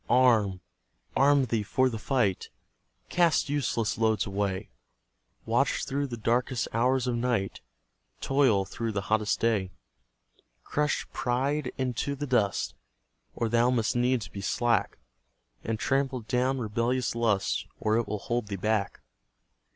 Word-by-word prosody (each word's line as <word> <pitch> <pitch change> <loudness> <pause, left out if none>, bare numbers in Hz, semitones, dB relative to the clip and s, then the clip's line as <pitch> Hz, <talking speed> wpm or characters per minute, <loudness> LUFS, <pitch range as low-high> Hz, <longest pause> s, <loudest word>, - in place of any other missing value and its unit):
Arm 110 -7 +4 0.5
arm 140 0 +4
thee 115 -2 0
for 130 +5 +2
the 115 -3 -3
fight! 110 -6 0 0.6
Cast 170 -5 +2
useless 125 -7 -1
loads 110 -1 +2
away; 100 -2 -2 0.7
Watch - - +1
through 140 +1 -1
the 120 -3 -6
darkest 120 +2 0
hours 125 +2 +2
of 125 - 0
night; 115 -5 -1 0.6
Toil 130 -8 +2
through 115 +2 -4
the 100 - -1
hottest 110 -1 +1
day. 110 -5 +1 0.9
Crush 150 0 -1
pride 135 +3 -1
into 130 +2 -1
the 145 +1 -4
dust, 120 -7 +1 0.6
Or 115 - 0
thou 120 +2 +3
must 120 -3 +1
needs 125 -1 +1
be 100 - -8
slack; 120 +4 0 0.7
And 115 0 -2
trample 135 +1 0
down 125 +4 0
rebellious 120 +2 -1
lust, 115 -4 0
Or 110 0 +1
it 115 - 0
will 105 - -2
hold 120 +2 -2
thee 100 - -3
back. 105 +1 -1
120 Hz, 135 wpm, -28 LUFS, 110-130 Hz, 0.9 s, Arm